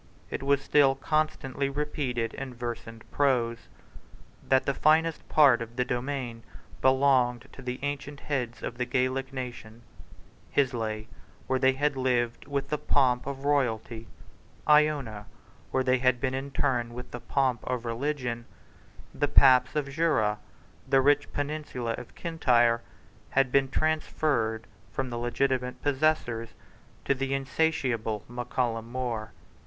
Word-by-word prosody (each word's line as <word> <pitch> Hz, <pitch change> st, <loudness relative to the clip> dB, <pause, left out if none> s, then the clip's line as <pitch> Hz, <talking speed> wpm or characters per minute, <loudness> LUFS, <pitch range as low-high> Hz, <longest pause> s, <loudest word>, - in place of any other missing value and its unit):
It -, -, -3 dB
was 140 Hz, 0 st, +2 dB
still 140 Hz, -2 st, +4 dB
constantly 140 Hz, -1 st, -1 dB
repeated, 135 Hz, -5 st, -2 dB
in 130 Hz, -2 st, -6 dB
verse 120 Hz, -1 st, -5 dB
and 115 Hz, 0 st, -11 dB
prose, 120 Hz, -5 st, +1 dB, 0.8 s
that 130 Hz, 0 st, +4 dB
the 140 Hz, -, +1 dB
finest 160 Hz, +3 st, +2 dB
part 140 Hz, -6 st, +6 dB
of 115 Hz, 0 st, -7 dB
the 125 Hz, 0 st, 0 dB
domain 125 Hz, -2 st, -3 dB, 0.4 s
belonging 130 Hz, -2 st, +3 dB
to -, -, -10 dB
the 125 Hz, -1 st, -4 dB
ancient 145 Hz, 0 st, -4 dB
heads 125 Hz, -5 st, -3 dB
of 120 Hz, -, -5 dB
the 125 Hz, -, +1 dB
Gaelic 130 Hz, +1 st, 0 dB
nation, 120 Hz, -3 st, -7 dB, 0.7 s
Islay, 115 Hz, -5 st, 0 dB, 0.4 s
where 130 Hz, 0 st, 0 dB
they 130 Hz, 0 st, +4 dB
had 145 Hz, +2 st, 0 dB
lived 120 Hz, -2 st, 0 dB
with 140 Hz, -1 st, -2 dB
the 150 Hz, -, -1 dB
pomp 125 Hz, -2 st, +2 dB
of 140 Hz, 0 st, -5 dB
royalty, 115 Hz, -5 st, 0 dB, 0.6 s
Iona, 145 Hz, -9 st, +3 dB, 0.4 s
where 130 Hz, -, +1 dB
they 130 Hz, 0 st, +2 dB
had 125 Hz, -1 st, +3 dB
been 130 Hz, 0 st, -1 dB
interred 130 Hz, -3 st, -1 dB
with 125 Hz, +1 st, -8 dB
the 120 Hz, -, -5 dB
pomp 130 Hz, -2 st, 0 dB
of 125 Hz, -2 st, -2 dB
religion, 120 Hz, -1 st, -2 dB, 0.7 s
the 145 Hz, -, 0 dB
paps 135 Hz, -2 st, +5 dB
of 150 Hz, -2 st, 0 dB
Jura, 135 Hz, -9 st, +1 dB, 0.5 s
the 135 Hz, 0 st, +5 dB
rich 145 Hz, +2 st, +3 dB
peninsula 145 Hz, -5 st, -3 dB
of -, -, -12 dB
Kintyre, 120 Hz, -8 st, +2 dB, 0.5 s
had 135 Hz, -2 st, +2 dB
been 135 Hz, 0 st, +3 dB
transferred 140 Hz, -7 st, 0 dB, 0.3 s
from 130 Hz, +4 st, -3 dB
the 120 Hz, -, -3 dB
legitimate 125 Hz, +1 st, -1 dB
possessors 135 Hz, -5 st, 0 dB, 0.5 s
to -, -, +3 dB
the 135 Hz, 0 st, -1 dB
insatiable 130 Hz, -7 st, 0 dB
Mac 125 Hz, 0 st, -6 dB
Callum 115 Hz, -2 st, -1 dB
More. 120 Hz, -4 st, -3 dB
130 Hz, 140 wpm, -28 LUFS, 120-140 Hz, 0.8 s, part